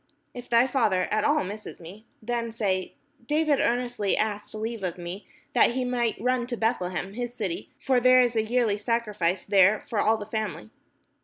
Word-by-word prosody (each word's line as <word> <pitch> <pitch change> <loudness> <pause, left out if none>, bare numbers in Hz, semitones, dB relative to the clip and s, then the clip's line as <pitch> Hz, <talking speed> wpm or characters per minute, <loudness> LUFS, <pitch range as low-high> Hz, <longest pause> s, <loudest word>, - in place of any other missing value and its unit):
If 245 0 -9
thy 235 +1 +5
father 215 -9 +1
at 215 0 +1
all 300 +1 +2
miss 205 +3 -8
me, 190 +7 -12 0.2
then 235 0 -2
say, 195 -5 -2 0.3
David 300 -1 +2
earnestly 245 -4 0
asked 210 0 -2
leave 220 +1 -4
of 180 -1 -3
me 175 +3 -7 0.3
that - - +4
he 260 -1 0
might 240 -2 -1
run 250 +1 0
to 240 -1 -4
Beth 225 0 +1
lehem 180 +2 -4
his 240 +1 -5
city: 195 -8 -4
for 260 -2 +2
there 255 +1 +6
is 245 -2 +3
a 220 - +3
yearly 220 -2 +1
sacrifice 210 -5 -1
there 200 +1 +4
for 220 - -2
all 220 +2 +3
the 210 - -7
family. 215 - -4
220 Hz, 185 wpm, -26 LUFS, 200-245 Hz, 0.3 s, there